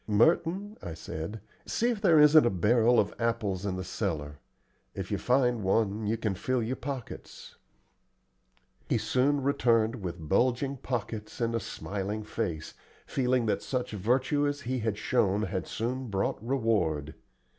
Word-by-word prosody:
"Merton," 165 - +2
I 80 - -6
said, 85 +6 -6 0.3
"see 240 +2 +1
if 220 -4 -4
there 170 -7 +6
isn't 150 +1 +8
a 120 - +3
barrel 115 +5 +3
of 100 - +1
apples 105 -5 -1
in 95 - -1
the 95 - -4
cellar. 80 -7 -3 0.6
If - - -5
you - - 0
find 125 -2 +2
one, 105 +2 +1
you 110 +2 +1
can 110 -3 -1
fill 125 +6 -1
your 120 +4 -2
pockets." 130 -2 -7 1.3
He - - +3
soon 130 +6 +1
returned 115 -4 +2
with 85 -3 -5
bulging 130 - +1
pockets 110 -4 -4
and 115 -1 0
a 115 - +1
smiling 105 0 -4
face, 95 -8 -4 0.3
feeling 125 -2 +1
that 110 - 0
such 125 -2 -3
virtue 130 +8 +1
as 145 0 -2
he 130 -1 -2
had 110 -2 -1
shown 105 -3 +1
had 95 -3 -3
soon 125 +3 -3
brought 100 0 -1
reward. 110 - 0
115 Hz, 155 wpm, -29 LUFS, 100-130 Hz, 1.3 s, isn't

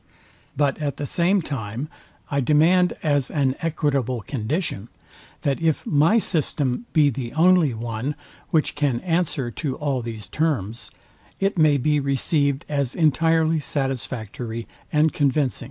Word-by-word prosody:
But 145 -1 +1
at 145 -2 -2
the 145 - -3
same 180 +5 +2
time 125 -1 -4 0.4
I 140 -1 +1
demand 165 +6 +4
as 145 -4 +1
an 135 -3 +1
equitable 140 -7 0
condition, 120 - -3 0.6
that 140 +2 0
if 160 -2 +1
my 155 +9 +4
system 155 - -1
be 150 -3 +4
the 120 -1 -5
only 165 -5 +4
one, 115 +5 -3 0.3
which 155 -2 +1
can 145 -5 0
answer 165 -8 -1
to 135 0 -3
all 140 -3 -1
these 115 -3 -6
terms, 115 - -2 0.5
it 195 +1 +1
may 155 -4 +4
be 150 +2 +1
receivd 140 +1 +1
as 140 -4 -1
entirely 160 0 +3
satisfactory 120 -5 -4 0.2
and 155 +1 +3
convincing. 140 -2 +1
145 Hz, 135 wpm, -23 LUFS, 125-160 Hz, 0.6 s, demand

